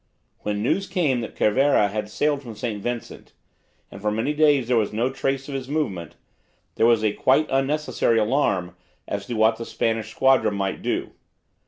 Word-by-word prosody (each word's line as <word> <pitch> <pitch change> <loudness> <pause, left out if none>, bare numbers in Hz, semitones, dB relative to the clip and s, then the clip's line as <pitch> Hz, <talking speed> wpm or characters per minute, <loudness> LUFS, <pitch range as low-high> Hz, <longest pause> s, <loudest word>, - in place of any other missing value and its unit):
When 105 0 -3
news 195 - 0
came 150 - 0
that 115 - -7
Cervera 125 -1 +3
had 105 +1 -4
sailed 145 +5 0
from 115 -5 -9
St. 110 -2 -4
Vincent, 120 +1 -6 0.6
and 100 - -10
for 105 - 0
many 110 +8 -1
days 145 -5 +3
there 125 - +2
was 110 -3 +1
no 115 +5 0
trace 135 0 -2
of 145 - -6
his 135 -1 -5
movements, 100 - -3 0.6
there 115 - +3
was 115 -2 +3
a 105 -1 +2
quite 135 +7 +3
unnecessary 135 -3 +1
alarm 105 -7 +1 0.3
as 100 0 -4
to 120 - -3
what 110 +1 +3
the 115 - -5
Spanish 115 -2 -1
squadron 130 -2 +3
might 95 -1 -2
do. - - -2
115 Hz, 180 wpm, -23 LUFS, 105-135 Hz, 0.6 s, Cervera